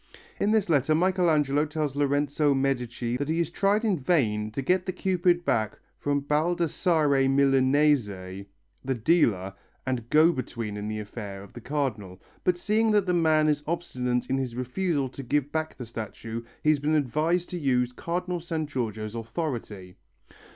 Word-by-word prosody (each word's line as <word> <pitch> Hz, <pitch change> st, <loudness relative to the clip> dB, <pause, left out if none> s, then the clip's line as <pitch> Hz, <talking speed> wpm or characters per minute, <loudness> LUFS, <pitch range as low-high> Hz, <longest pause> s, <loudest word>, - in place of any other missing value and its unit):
In 205 Hz, -, +2 dB
this 215 Hz, -2 st, +2 dB
letter 155 Hz, -1 st, +3 dB
Michelangelo 160 Hz, -5 st, +2 dB
tells 150 Hz, -2 st, -2 dB
Lorenzo 145 Hz, 0 st, +1 dB
Medici 125 Hz, -3 st, -1 dB
that 145 Hz, +2 st, -3 dB
he 160 Hz, -, +1 dB
has 170 Hz, -2 st, 0 dB
tried 205 Hz, +3 st, +1 dB
in 195 Hz, -7 st, +1 dB
vain 110 Hz, -9 st, +1 dB
to 120 Hz, +5 st, -4 dB
get 185 Hz, +5 st, +1 dB
the -, -, +1 dB
Cupid 175 Hz, -2 st, +1 dB
back 110 Hz, -2 st, 0 dB, 0.2 s
from 145 Hz, 0 st, 0 dB
Baldassarre 155 Hz, -2 st, +2 dB
Milanese, 135 Hz, -1 st, +3 dB, 0.8 s
the 135 Hz, 0 st, -1 dB
dealer 110 Hz, -, +2 dB, 0.3 s
and 125 Hz, -3 st, -3 dB
go 155 Hz, +3 st, +6 dB
between 115 Hz, -7 st, -4 dB
in 105 Hz, 0 st, -4 dB
the 110 Hz, 0 st, -3 dB
affair 105 Hz, -2 st, -7 dB
of 100 Hz, -, -15 dB
the 120 Hz, -, -9 dB
Cardinal, 110 Hz, -10 st, -3 dB, 0.2 s
but 180 Hz, -1 st, +2 dB
seeing 215 Hz, +4 st, +1 dB
that 210 Hz, -2 st, +3 dB
the 180 Hz, -, +1 dB
man 160 Hz, -3 st, +3 dB
is 150 Hz, -1 st, +1 dB
obstinate 125 Hz, -8 st, -2 dB
in 135 Hz, +1 st, 0 dB
his 125 Hz, -3 st, -3 dB
refusal 140 Hz, +3 st, -1 dB
to 135 Hz, -, -8 dB
give 145 Hz, +2 st, -1 dB
back 160 Hz, 0 st, -3 dB
the 125 Hz, -, -6 dB
statue 115 Hz, 0 st, -6 dB, 0.2 s
he 155 Hz, -, +3 dB
has 150 Hz, -, +1 dB
been 150 Hz, +2 st, +1 dB
advised 155 Hz, +6 st, 0 dB
to 180 Hz, -, -3 dB
use 125 Hz, -4 st, +1 dB
Cardinal 175 Hz, +6 st, -3 dB
San 160 Hz, -2 st, -3 dB
Giorgio's 110 Hz, -6 st, -4 dB
authority. 115 Hz, -, -5 dB
145 Hz, 165 wpm, -27 LUFS, 120-165 Hz, 0.8 s, go